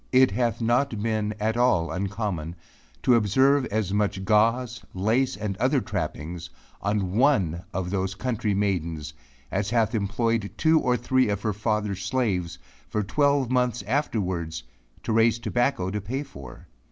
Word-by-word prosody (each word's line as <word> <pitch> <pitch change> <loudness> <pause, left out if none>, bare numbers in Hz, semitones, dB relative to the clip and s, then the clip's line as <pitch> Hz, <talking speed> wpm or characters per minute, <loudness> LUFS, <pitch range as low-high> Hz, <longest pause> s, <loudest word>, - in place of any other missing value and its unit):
It 130 -2 +5
hath 115 +2 0
not 120 -1 +1
been 110 -2 -1
at 110 +2 0
all 120 -9 +2
uncommon 95 -4 -3 0.5
to 125 - +5
observe 130 +5 +3
as 100 -2 -1
much 100 -2 0
gauze, 115 +4 +2
lace 115 +8 +1
and 105 -2 -3
other - - +2
trappings, 85 +4 -4 0.3
on 100 -2 0
one 95 - +2
of 90 -1 -3
those 95 0 -1
country 115 -3 -1
maidens 85 -7 -1 0.4
as 100 +1 -1
hath 115 0 +1
employed 110 0 0
two 160 0 +4
or 125 -3 +1
three 130 0 +2
of 100 0 -2
her 105 -2 0
father's 105 -2 -1
slaves, 95 -7 -1 0.3
for 105 - -1
twelve 140 +3 +2
months 125 -3 +1
afterwards, 95 - -2 0.4
to 115 - -1
raise 115 +1 +4
tobacco 120 -5 0
to 105 +1 -3
pay 130 +8 -3
for. 70 - -12
105 Hz, 150 wpm, -25 LUFS, 95-120 Hz, 0.5 s, It